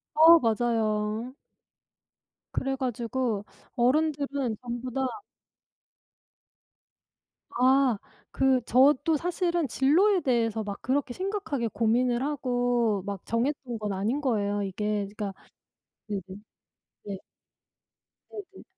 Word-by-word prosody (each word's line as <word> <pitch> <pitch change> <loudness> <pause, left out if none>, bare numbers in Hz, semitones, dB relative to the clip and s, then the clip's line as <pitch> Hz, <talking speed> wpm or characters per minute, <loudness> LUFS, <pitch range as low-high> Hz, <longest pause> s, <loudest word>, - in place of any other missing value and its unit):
어 325 +2 +8
맞아요. 225 0 0 1.2
그래 270 0 -1
가지고 240 -4 -2 0.3
어른들은 280 -2 +1
전부 245 +1 -5
다 265 +1 -1 2.4
아. 260 -1 +3 0.3
그 265 -2 +2
저도 290 +5 +4
사실은 345 -1 -1
진로에 350 - +3
대해서 230 -4 +1
막 200 -1 -6
그렇게 260 0 0
심각하게 370 - -2
고민을 240 +3 +1
하고 245 -6 0
막 200 -2 -6
정했던 240 0 -2
건 210 -2 -3
아닌 220 +10 -1
거예요 205 -6 0
이게. 205 +1 -2
그러니까 205 -3 -4 0.7
네네. 200 -2 -3 0.8
네. 200 -2 -5 1.1
네네. 400 -2 -10
245 Hz, 200 characters per minute, -27 LUFS, 220-280 Hz, 2.4 s, 어